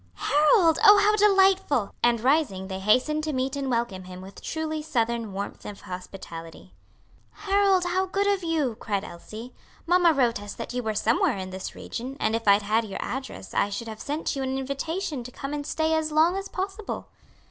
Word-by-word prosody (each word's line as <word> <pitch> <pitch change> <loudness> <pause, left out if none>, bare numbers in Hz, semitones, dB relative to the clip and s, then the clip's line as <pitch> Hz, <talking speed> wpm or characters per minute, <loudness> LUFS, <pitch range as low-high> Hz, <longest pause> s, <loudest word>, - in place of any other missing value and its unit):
"Harold! 310 - +4
oh, 415 -1 +9
how 415 +1 +4
delightful!" 385 - +3
And 235 -1 +3
rising 245 -9 +1
they 190 0 -4
hastened 255 +10 +2
to 310 -1 -2
meet 260 +1 -1
and 275 -1 -2
welcome 230 -6 -2
him 180 0 -9
with 190 +1 -11
truly 315 -1 -3
Southern 235 -7 -1
warmth 200 +1 -6
of 205 -1 -8
hospitality. 180 -3 -9 0.6
"Harold! 395 -2 +2
how 370 +2 0
good 395 +2 0
of 400 -2 +1
you!" 315 -7 0
cried 200 -2 -2
Elsie. 215 +7 -9 0.3
"Mamma 350 0 +5
wrote 245 -7 +1
us 205 - -8
that 230 - -6
you 250 - -1
were 220 -2 -2
somewhere 220 -1 +2
in 185 -1 -6
this 190 0 -6
region, 260 +3 -6
and 220 +1 +1
if 230 -1 -4
I'd 200 +1 +6
had 220 +3 +2
your 205 -3 -6
address, 265 -6 -6
I - - +2
should 215 +3 -5
have 220 -1 -7
sent 295 +2 -2
you 275 - -3
an 265 0 -1
invitation 280 +2 -3
to 250 - -9
come 275 +3 -6
and 290 0 -4
stay 320 0 0
as 315 -1 0
long 320 +4 +4
as 390 0 -4
possible." 390 +2 -5
265 Hz, 195 wpm, -26 LUFS, 215-325 Hz, 0.6 s, oh